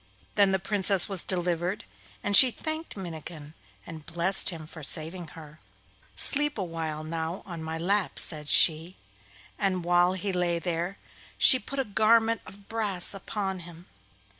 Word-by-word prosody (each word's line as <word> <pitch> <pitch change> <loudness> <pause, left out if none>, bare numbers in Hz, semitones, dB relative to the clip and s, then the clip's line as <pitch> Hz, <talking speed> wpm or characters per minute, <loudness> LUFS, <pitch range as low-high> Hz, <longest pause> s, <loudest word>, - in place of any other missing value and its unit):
Then 200 -2 +3
the 190 - +1
Princess 195 -1 +3
was 195 -3 0
delivered, 180 +1 -2 0.4
and 205 0 0
she 260 +4 +9
thanked 315 +2 -7
Minnikin 160 -4 -9 0.3
and 160 -2 -10
blessed 170 +4 +2
him 165 -4 -7
for 160 +1 -12
saving 165 +4 0
her. 155 -1 -13 0.6
'Sleep 295 -1 +3
a 200 - -3
while 160 -3 -6
now 160 +2 -5
on 170 -4 -8
my 160 0 -5
lap,' 195 +4 -1
said 150 -3 +3
she, 165 +3 +3 0.6
and 190 -3 -1
while 175 +1 +2
he 190 +1 -4
lay 175 -1 -1
there 175 +2 -4 0.4
she 260 - +7
put 275 - -9
a 270 - -1
garment 225 +2 +2
of 200 +1 -14
brass 205 -6 -2
upon 195 -1 -5
him. 175 0 -13
180 Hz, 155 wpm, -26 LUFS, 165-200 Hz, 0.6 s, she